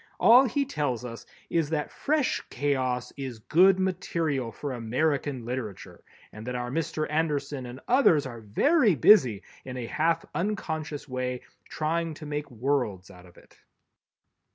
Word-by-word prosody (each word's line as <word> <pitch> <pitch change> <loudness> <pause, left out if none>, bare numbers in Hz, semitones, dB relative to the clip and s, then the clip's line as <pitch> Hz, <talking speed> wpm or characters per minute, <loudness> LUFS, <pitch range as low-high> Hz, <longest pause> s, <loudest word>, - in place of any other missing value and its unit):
All 250 +4 +7
he 280 +4 0
tells 140 - -2
us 115 -1 -8 0.2
is 165 -3 +1
that 155 -2 -2
fresh 300 -2 0
chaos 130 -2 -1
is 130 -4 -5
good 180 - +4
material 165 -9 -1
for 140 +3 -5
American 130 +2 -1
literature, 120 -5 -6 0.3
and 110 +2 -10
that 125 - -3
our 125 0 -3
Mr. 160 +1 -1
Anderson 145 -4 -1
and 125 +2 -9
others 235 - +4
are 120 -3 -7
very 215 - +3
busy 125 - +5 0.2
in 130 -1 -7
a 120 - -4
half 160 +5 0
unconscious 160 -5 -3
way, 125 -1 -3 0.3
trying 165 +1 -1
to 155 - -10
make 150 0 -4
"worlds" 120 -7 -2
out 90 -1 -15
of 85 - -20
it. - - -20
145 Hz, 150 wpm, -27 LUFS, 125-165 Hz, 0.3 s, All